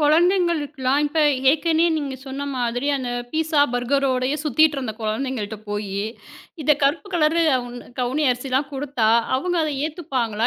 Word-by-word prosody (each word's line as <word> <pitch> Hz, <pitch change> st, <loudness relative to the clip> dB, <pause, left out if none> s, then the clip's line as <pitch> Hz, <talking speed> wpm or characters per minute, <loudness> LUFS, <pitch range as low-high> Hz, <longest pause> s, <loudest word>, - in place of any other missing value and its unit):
குழந்தைங்களுக்குலாம், 310 Hz, -4 st, +2 dB
இப்ப 310 Hz, +2 st, 0 dB, 0.3 s
ஏற்கனே 320 Hz, +2 st, +2 dB
நீங்கச் 275 Hz, -4 st, -4 dB
சொன்ன 270 Hz, +1 st, -5 dB, 0.2 s
மாதிரி, 245 Hz, +2 st, -1 dB
அந்த 260 Hz, -2 st, -4 dB, 0.2 s
பீட்சா 315 Hz, -2 st, +2 dB
பர்கரோடயே 260 Hz, +2 st, +1 dB
சுத்திட்டு 305 Hz, +1 st, +3 dB
இருந்த 250 Hz, -5 st, -3 dB
குழந்தைங்கள்கிட்ட 220 Hz, -1 st, -3 dB
போயி, 205 Hz, -1 st, -3 dB, 0.6 s
இத 300 Hz, +1 st, +4 dB
கருப்பு 300 Hz, +8 st, +1 dB
கலர் 320 Hz, 0 st, +2 dB
கவு 250 Hz, -3 st, 0 dB, 0.3 s
கவுனி 260 Hz, +5 st, 0 dB
அரிசிலாம் 260 Hz, +3 st, -1 dB
கொடுத்தா, 265 Hz, -5 st, 0 dB, 0.3 s
அவங்க 355 Hz, +5 st, -1 dB
அதை 300 Hz, -2 st, -2 dB
ஏத்துப்பாங்களா 255 Hz, -, -2 dB
275 Hz, 130 wpm, -22 LUFS, 250-310 Hz, 0.6 s, இத